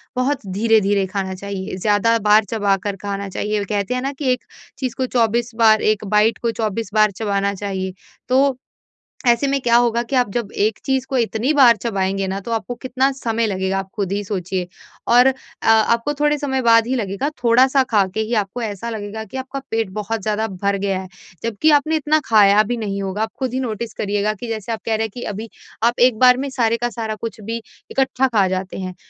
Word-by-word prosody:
बहुत 255 Hz, -1 st, -1 dB
धीरे-धीरे 205 Hz, -2 st, +2 dB
खाना 190 Hz, -1 st, -3 dB
चाहिए। 195 Hz, -1 st, -5 dB
ज़्यादा 210 Hz, +4 st, +2 dB
बार 210 Hz, +1 st, +5 dB
चबाकर 200 Hz, -1 st, -1 dB
खाना 200 Hz, 0 st, -4 dB
चाहिए 210 Hz, +2 st, -2 dB
कहते 200 Hz, +2 st, -2 dB
हैं 250 Hz, -, -1 dB
न 275 Hz, -, -2 dB
कि 270 Hz, -4 st, +1 dB
एक 250 Hz, -, -1 dB, 0.3 s
चीज़ 255 Hz, -3 st, -3 dB
को 260 Hz, -, 0 dB
24 235 Hz, -1 st, +1 dB
बार 220 Hz, -2 st, +5 dB
1 210 Hz, 0 st, -9 dB
बाइट 215 Hz, +2 st, +4 dB
को 235 Hz, -, 0 dB
24 220 Hz, -2 st, -3 dB
बार 215 Hz, -1 st, +4 dB
चबाना 200 Hz, -2 st, 0 dB
चाहिए। 190 Hz, -1 st, -4 dB, 0.4 s
तो 265 Hz, +1 st, +3 dB, 0.7 s
ऐसे 240 Hz, +3 st, +4 dB
में 275 Hz, 0 st, 0 dB
क्या 235 Hz, -1 st, +3 dB
होगा 235 Hz, -1 st, +2 dB
कि 250 Hz, +3 st, -3 dB
आप 250 Hz, -3 st, +3 dB
जब 235 Hz, -3 st, -2 dB
एक 215 Hz, +1 st, +1 dB
चीज़ 265 Hz, -2 st, 0 dB
को 265 Hz, -, 0 dB
इतनी 230 Hz, +3 st, 0 dB
बार 250 Hz, -5 st, +7 dB
चबाएँगे 195 Hz, -3 st, -1 dB
न 190 Hz, +1 st, -2 dB
तो 215 Hz, -, -8 dB
आपको 225 Hz, +2 st, -2 dB
कितना 260 Hz, +1 st, +1 dB
समय 230 Hz, -3 st, -1 dB
लगेगा 190 Hz, -1 st, -1 dB
आप 195 Hz, 0 st, -4 dB
खुद 195 Hz, -2 st, -2 dB
ही 205 Hz, +1 st, -1 dB
सोचिए। 185 Hz, -2 st, -3 dB, 0.5 s
और 245 Hz, +1 st, +7 dB
अ 265 Hz, -, +4 dB, 0.3 s
आपको 230 Hz, +5 st, +3 dB
थोड़े 295 Hz, 0 st, +3 dB
समय 265 Hz, -2 st, -1 dB
बाद 230 Hz, -1 st, +5 dB
ही 255 Hz, -, -1 dB
लगेगा 200 Hz, +3 st, -2 dB, 0.2 s
थोड़ा-सा 260 Hz, +3 st, +5 dB
खा 205 Hz, -4 st, +3 dB
के -, -, -1 dB
ही 220 Hz, +2 st, -1 dB
आपको 215 Hz, +3 st, -2 dB
ऐसा 215 Hz, +1 st, -4 dB
लगेगा 220 Hz, 0 st, -5 dB
कि 220 Hz, -, -10 dB
आपका 260 Hz, +1 st, -5 dB
पेट 225 Hz, -3 st, -1 dB
बहुत 215 Hz, +3 st, -3 dB
ज़्यादा 215 Hz, +1 st, 0 dB
भर 200 Hz, +1 st, -1 dB
गया 195 Hz, -1 st, -1 dB
है 190 Hz, -, -9 dB, 0.4 s
जबकि 230 Hz, +7 st, +2 dB
आपने 305 Hz, +2 st, +3 dB
इतना 310 Hz, 0 st, +2 dB
खाया 210 Hz, -1 st, +6 dB
भी 240 Hz, +3 st, -3 dB
नहीं 200 Hz, -3 st, -3 dB
होगा। 195 Hz, +2 st, -3 dB
आप 220 Hz, -, -2 dB
खुद 260 Hz, -3 st, -2 dB
ही 260 Hz, -, 0 dB
नोटिस 230 Hz, -2 st, -4 dB
करिएगा 205 Hz, +1 st, -1 dB
कि 230 Hz, +3 st, -8 dB
जैसे 225 Hz, 0 st, -4 dB
आप 220 Hz, -, -4 dB
कह 225 Hz, -, +1 dB
रहे 220 Hz, +1 st, 0 dB
हैं 220 Hz, -, -12 dB
कि 245 Hz, -, -7 dB
अभी 220 Hz, +3 st, -6 dB, 0.4 s
आप 240 Hz, +1 st, +2 dB
एक 245 Hz, -2 st, +4 dB
बार 250 Hz, 0 st, +6 dB
में 275 Hz, +1 st, -2 dB
सारे 230 Hz, -3 st, +1 dB
का 240 Hz, -, 0 dB
सारा 220 Hz, -1 st, -4 dB
कुछ 220 Hz, +1 st, -7 dB
भी 230 Hz, +2 st, -4 dB, 0.3 s
इकट्ठा 265 Hz, -1 st, +1 dB
खा 210 Hz, -6 st, +2 dB
जाते 185 Hz, 0 st, -3 dB
हैं। 185 Hz, -1 st, -5 dB
220 Hz, 215 wpm, -20 LUFS, 200-245 Hz, 0.7 s, बार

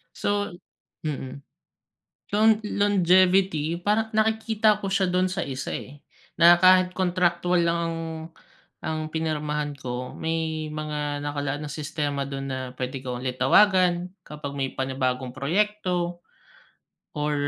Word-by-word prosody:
So, 205 Hz, -2 st, -1 dB, 0.5 s
mm. 140 Hz, -2 st, -5 dB, 0.9 s
Lo 210 Hz, +2 st, +2 dB, 0.2 s
longevity 185 Hz, -5 st, +3 dB
parang 220 Hz, +3 st, 0 dB
nakikita 220 Hz, -1 st, +2 dB
ko 190 Hz, -, -2 dB
siya 195 Hz, -2 st, +2 dB
do'n 185 Hz, +1 st, +1 dB
sa 190 Hz, -, -2 dB
isa 130 Hz, -3 st, -4 dB
eh, 145 Hz, +2 st, -7 dB, 0.3 s
na 170 Hz, +1 st, +7 dB
kahit 185 Hz, 0 st, +6 dB
contractual 180 Hz, -1 st, +1 dB
lang 170 Hz, 0 st, +1 dB
ang 165 Hz, 0 st, -3 dB, 0.9 s
ang 155 Hz, 0 st, -2 dB
pinirmahan 150 Hz, -2 st, -2 dB
ko, 125 Hz, -2 st, -5 dB
may 160 Hz, -1 st, -2 dB
mga 150 Hz, -1 st, -3 dB
nakalaan 145 Hz, 0 st, -3 dB
na 145 Hz, -, -6 dB
sistema 145 Hz, -2 st, -3 dB
do'n 135 Hz, -1 st, -5 dB
na 130 Hz, -1 st, -3 dB, 0.2 s
pwede 130 Hz, +1 st, -4 dB
ko 125 Hz, -2 st, -4 dB
ulit 125 Hz, 0 st, -4 dB
tawagan 180 Hz, +3 st, +4 dB, 0.2 s
kapag 150 Hz, -2 st, -6 dB
may 135 Hz, -, 0 dB
panibagong 130 Hz, -1 st, -1 dB
proyekto, 175 Hz, +3 st, -1 dB, 0.9 s
or 150 Hz, -1 st, -1 dB
160 Hz, 125 wpm, -25 LUFS, 145-185 Hz, 0.9 s, na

